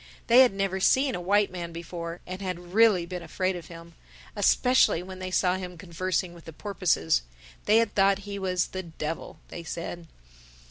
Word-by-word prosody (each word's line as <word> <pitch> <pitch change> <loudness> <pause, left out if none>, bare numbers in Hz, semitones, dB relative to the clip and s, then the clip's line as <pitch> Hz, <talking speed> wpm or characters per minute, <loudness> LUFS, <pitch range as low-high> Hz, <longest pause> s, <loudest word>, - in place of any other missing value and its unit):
They 240 +2 +6
had 260 -2 +7
never 195 -1 -1
seen 265 +7 +3
a 180 - -3
white 200 +2 +2
man 175 -2 -6
before 170 0 -7
and 185 +1 -7
had 180 -2 -5
really 215 -5 +5
been 180 +1 -6
afraid 185 +2 -2
of 170 -2 -8
him—especially 175 +5 0
when 185 0 -9
they 185 0 -4
saw 185 0 +2
him 180 -1 -7
conversing 180 +1 -2
with 170 -1 -15
the 165 - -9
porpoises. 160 - 0 0.4
They 215 - +5
had 230 -2 +2
thought 195 0 +4
he 200 -1 -5
was 185 -2 0
the 185 - -4
Devil, 165 -2 -6
they 170 - -7
said. 170 0 -6
185 Hz, 180 wpm, -27 LUFS, 170-195 Hz, 0.4 s, had